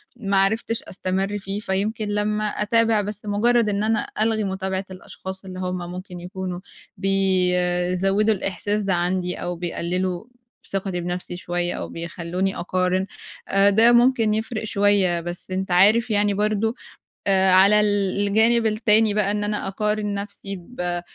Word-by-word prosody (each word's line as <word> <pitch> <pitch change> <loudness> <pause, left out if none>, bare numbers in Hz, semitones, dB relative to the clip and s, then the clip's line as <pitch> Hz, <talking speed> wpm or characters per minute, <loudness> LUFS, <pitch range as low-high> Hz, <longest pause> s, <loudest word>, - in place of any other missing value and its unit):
ما 200 -5 -1
عرفتش 220 +4 +1
أستمر 190 +2 -2
فيه، 195 +1 -4
فيمكن 210 +2 -2
لمّا 210 +1 0
أتابع 225 +1 +2
بس 210 +1 -6
مُجرّد 220 +2 +2
إن 205 0 -1
أنا 220 0 0
ألغي 220 0 +1
متابعة 190 0 -3
الأشخاص 190 +1 -8
اللي 185 -1 -7
هُم 185 0 -2
ممكن 180 0 -8
يكونوا 180 0 -5 0.4
بيزوّدوا 185 +1 +1
الإحساس 205 +2 -2
ده 195 -2 0
عندي، 180 +1 -1
أو 175 0 -4
بيقللوا 180 +2 -3 0.5
ثِقَتي 190 -2 -2
بنفْسي 175 0 -4
شوية، 175 0 -2
أو - - -5
بيخلّوني 170 +3 -3
أقارن، 185 +1 0 0.4
آآ 195 +1 +4
ده 225 +4 +5
ممكن 240 -2 +4
يفرِق 220 +1 -3
شوية، 200 -4 +2
بس 175 +2 -6
أنت 190 0 -2
عارف 215 +7 +5
يعني 205 -1 +2
برضه 215 +2 0 0.5
آآ 190 -1 +4
على 195 +3 +6
ال 205 -1 +1
الجانب 225 +3 +3
التاني 215 0 +3
بقى 205 -1 +1
إن 205 0 -1
أنا 210 -1 -2
أقارن 210 +1 -1
نفْسي 200 0 -6
ب 175 -2 -4
195 Hz, 145 wpm, -23 LUFS, 185-210 Hz, 0.5 s, على